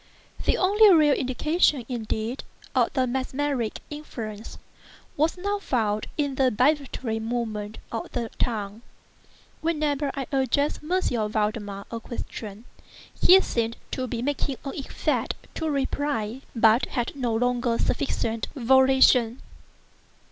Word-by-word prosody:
The -, -, +3 dB
only 410 Hz, +3 st, +6 dB
real 305 Hz, -4 st, +6 dB
indication, 280 Hz, +1 st, +1 dB
indeed, 230 Hz, 0 st, -3 dB, 0.3 s
of -, -, +2 dB
the 260 Hz, -2 st, +2 dB
mesmeric 260 Hz, -1 st, -2 dB
influence, 225 Hz, -8 st, -7 dB, 0.6 s
was 315 Hz, +5 st, +1 dB
now 405 Hz, +3 st, -1 dB
found 215 Hz, -, -1 dB
in 285 Hz, -2 st, 0 dB
the 265 Hz, -1 st, +3 dB
vibratory 255 Hz, -2 st, 0 dB
movement 220 Hz, -2 st, -3 dB
of 225 Hz, -, -4 dB
the 235 Hz, -2 st, -3 dB
tongue, 215 Hz, -2 st, -2 dB, 0.8 s
whenever 300 Hz, -3 st, 0 dB
I 275 Hz, -2 st, -3 dB
addressed 275 Hz, +2 st, +1 dB
M. 360 Hz, +5 st, +1 dB, 0.3 s
Valdemar 210 Hz, -2 st, -2 dB
a 230 Hz, -, -3 dB
question. 225 Hz, -2 st, -7 dB, 0.6 s
He 375 Hz, +1 st, +8 dB
seemed 230 Hz, -6 st, -1 dB
to 255 Hz, -1 st, -2 dB
be 235 Hz, -1 st, -3 dB
making 280 Hz, -1 st, -1 dB
an 275 Hz, -, -4 dB
effort 275 Hz, -, -1 dB, 0.2 s
to 320 Hz, -, -2 dB
reply, 270 Hz, -4 st, -1 dB
but 225 Hz, +2 st, +4 dB
had 240 Hz, +2 st, -3 dB
no 245 Hz, -5 st, -1 dB
longer 245 Hz, 0 st, +1 dB
sufficient 230 Hz, -5 st, -1 dB
volition. 260 Hz, -2 st, +4 dB
255 Hz, 120 wpm, -25 LUFS, 225-285 Hz, 0.8 s, He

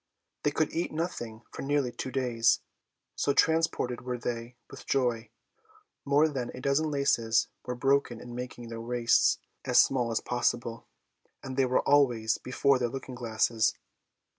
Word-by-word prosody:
They -, -, +2 dB
could 150 Hz, +1 st, -1 dB
eat 170 Hz, +2 st, -1 dB
nothing 120 Hz, -9 st, -4 dB
for -, -, -7 dB
nearly 140 Hz, -2 st, 0 dB
two 130 Hz, -, -5 dB
days, 125 Hz, -3 st, +2 dB, 0.5 s
so 140 Hz, -, +1 dB
transported 160 Hz, -6 st, +1 dB
were 125 Hz, 0 st, -3 dB
they 120 Hz, 0 st, -5 dB
with -, -, -12 dB
joy. 120 Hz, -4 st, 0 dB, 0.8 s
More 145 Hz, +2 st, +4 dB
than 130 Hz, -5 st, -3 dB
a -, -, -7 dB
dozen 140 Hz, +4 st, +1 dB
laces 120 Hz, -6 st, +2 dB, 0.2 s
were 125 Hz, -, -2 dB
broken 135 Hz, -2 st, +1 dB
in 120 Hz, 0 st, -9 dB
making 120 Hz, -1 st, -7 dB
their 115 Hz, 0 st, -6 dB
waists 120 Hz, 0 st, +3 dB, 0.3 s
as -, -, +4 dB
small 125 Hz, -3 st, +3 dB
as 115 Hz, -, 0 dB
possible, 120 Hz, -1 st, -2 dB, 0.6 s
and 130 Hz, -1 st, -6 dB
they 135 Hz, -1 st, +3 dB
were 125 Hz, -, +1 dB
always 120 Hz, -6 st, +3 dB
before 135 Hz, +1 st, +2 dB
their 120 Hz, -1 st, 0 dB
looking 130 Hz, +1 st, -7 dB
glasses. 115 Hz, -1 st, +1 dB
125 Hz, 155 wpm, -29 LUFS, 115-140 Hz, 0.8 s, More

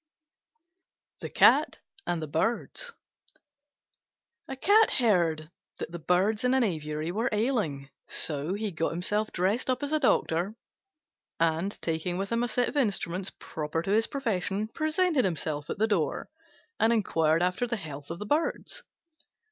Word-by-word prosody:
THE -, -, -6 dB
CAT -, -, +5 dB, 0.3 s
AND 170 Hz, -2 st, -1 dB
THE -, -, -4 dB
BIRDS 235 Hz, -, -2 dB, 1.5 s
A 270 Hz, -, -5 dB
Cat 415 Hz, +10 st, +5 dB
heard 170 Hz, -9 st, +2 dB, 0.3 s
that -, -, -6 dB
the 170 Hz, -, -6 dB
Birds 190 Hz, +7 st, +1 dB
in 250 Hz, +1 st, +3 dB
an 265 Hz, -, +3 dB
aviary 155 Hz, -4 st, -2 dB
were 225 Hz, +6 st, 0 dB
ailing. 210 Hz, -, -1 dB, 0.2 s
So 150 Hz, +4 st, 0 dB
he 210 Hz, 0 st, -3 dB
got 165 Hz, -1 st, -1 dB
himself 210 Hz, +5 st, 0 dB
up 235 Hz, +9 st, 0 dB
as 285 Hz, -, -2 dB
a 310 Hz, -, +3 dB
doctor, 180 Hz, -, +1 dB, 0.8 s
and, 165 Hz, +4 st, 0 dB
taking 165 Hz, +2 st, -1 dB
with 195 Hz, +2 st, -3 dB
him 230 Hz, 0 st, +1 dB
a 245 Hz, -, +1 dB
set 240 Hz, +1 st, +1 dB
of -, -, -8 dB
the 295 Hz, -, +1 dB
instruments 195 Hz, -5 st, 0 dB
proper 160 Hz, +1 st, -4 dB
to 195 Hz, -, -2 dB
his 220 Hz, +2 st, +3 dB
profession, 215 Hz, -5 st, -2 dB
presented 310 Hz, 0 st, +1 dB
himself 155 Hz, -5 st, -2 dB
at -, -, -3 dB
the 215 Hz, -, +3 dB
door, 195 Hz, -, -1 dB, 0.5 s
and 225 Hz, -, +4 dB
inquired 165 Hz, -7 st, +2 dB
after 180 Hz, +7 st, 0 dB
the 235 Hz, -1 st, -2 dB
health 145 Hz, -6 st, -7 dB
of 165 Hz, -, -5 dB
the 210 Hz, -, -6 dB
Birds. 315 Hz, -, -1 dB
195 Hz, 155 wpm, -28 LUFS, 165-235 Hz, 1.5 s, CAT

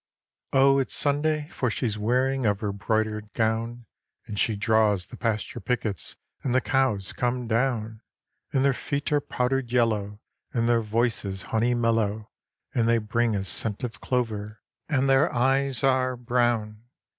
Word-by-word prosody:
Oh 135 Hz, +1 st, +5 dB
it's 135 Hz, -, -1 dB
Sunday, 150 Hz, +1 st, +1 dB
for 125 Hz, -, -1 dB
she's 110 Hz, -1 st, -1 dB
wearing 130 Hz, +5 st, +1 dB
of 100 Hz, -1 st, +1 dB
her 105 Hz, -2 st, -2 dB
broidered 105 Hz, +1 st, -1 dB
gown; 115 Hz, +1 st, -1 dB, 0.4 s
And 105 Hz, -, -5 dB
she 110 Hz, -, +2 dB
draws 105 Hz, -2 st, +2 dB
the -, -, -11 dB
pasture 110 Hz, -3 st, -2 dB
pickets 110 Hz, -, -2 dB, 0.3 s
and 125 Hz, -2 st, -1 dB
the -, -, +6 dB
cows 130 Hz, -8 st, 0 dB
come 125 Hz, 0 st, -1 dB
down; 115 Hz, -2 st, -1 dB, 0.5 s
And 135 Hz, 0 st, +2 dB
their 140 Hz, -, +4 dB
feet 140 Hz, +3 st, -3 dB
are 145 Hz, -1 st, +3 dB
powdered 125 Hz, -2 st, -1 dB
yellow, 105 Hz, -4 st, +1 dB, 0.3 s
and 115 Hz, -2 st, +1 dB
their 120 Hz, -1 st, +3 dB
voices 105 Hz, -3 st, -1 dB
honey 120 Hz, +2 st, +2 dB
mellow, 110 Hz, -2 st, 0 dB, 0.4 s
And 115 Hz, -1 st, +2 dB
they 115 Hz, -, +4 dB
bring 115 Hz, +1 st, 0 dB
a 100 Hz, -, -1 dB
scent 105 Hz, +4 st, -1 dB
of 120 Hz, -2 st, -5 dB
clover, 110 Hz, -4 st, -2 dB, 0.3 s
and 135 Hz, -3 st, +2 dB
their 135 Hz, +5 st, +4 dB
eyes 135 Hz, +2 st, +2 dB
are 130 Hz, -1 st, +2 dB
brown. 120 Hz, -3 st, 0 dB
115 Hz, 155 wpm, -26 LUFS, 110-130 Hz, 0.5 s, the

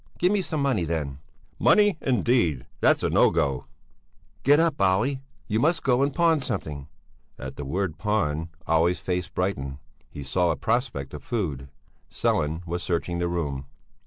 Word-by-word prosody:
Give 180 Hz, +2 st, +3 dB
me 205 Hz, -1 st, +2 dB
some 155 Hz, -4 st, -2 dB
money, 130 Hz, -10 st, +1 dB
then!" 75 Hz, -4 st, -3 dB, 0.4 s
"Money, 205 Hz, -5 st, +4 dB
indeed! 115 Hz, -, +1 dB
That's -, -, +3 dB
no -, -, +4 dB
go!" 70 Hz, -3 st, -1 dB, 0.7 s
"Get 145 Hz, +3 st, +5 dB
up, 165 Hz, -8 st, +1 dB
Olle! 100 Hz, +9 st, +2 dB, 0.3 s
You 110 Hz, 0 st, 0 dB
must 165 Hz, +5 st, +2 dB
go 125 Hz, 0 st, +3 dB
and 140 Hz, +1 st, +2 dB
pawn 165 Hz, 0 st, +3 dB
something." 75 Hz, -, -4 dB, 0.5 s
At -, -, -7 dB
the 70 Hz, -, -6 dB
word 85 Hz, +2 st, -2 dB
pawn 80 Hz, -6 st, 0 dB, 0.2 s
Olle's 85 Hz, +2 st, +3 dB
face 90 Hz, -1 st, -2 dB
brightened; 70 Hz, -8 st, -2 dB, 0.3 s
he 70 Hz, -, -8 dB
saw 85 Hz, +6 st, +1 dB
a -, -, +1 dB
prospect 115 Hz, -, -1 dB
of 75 Hz, -, -7 dB
food. 75 Hz, -, -3 dB, 0.4 s
Sellén 80 Hz, +4 st, 0 dB
was 85 Hz, +1 st, -3 dB
searching 85 Hz, 0 st, -1 dB
the 85 Hz, -, 0 dB
room. 70 Hz, -6 st, -3 dB
90 Hz, 160 wpm, -26 LUFS, 75-125 Hz, 0.7 s, Get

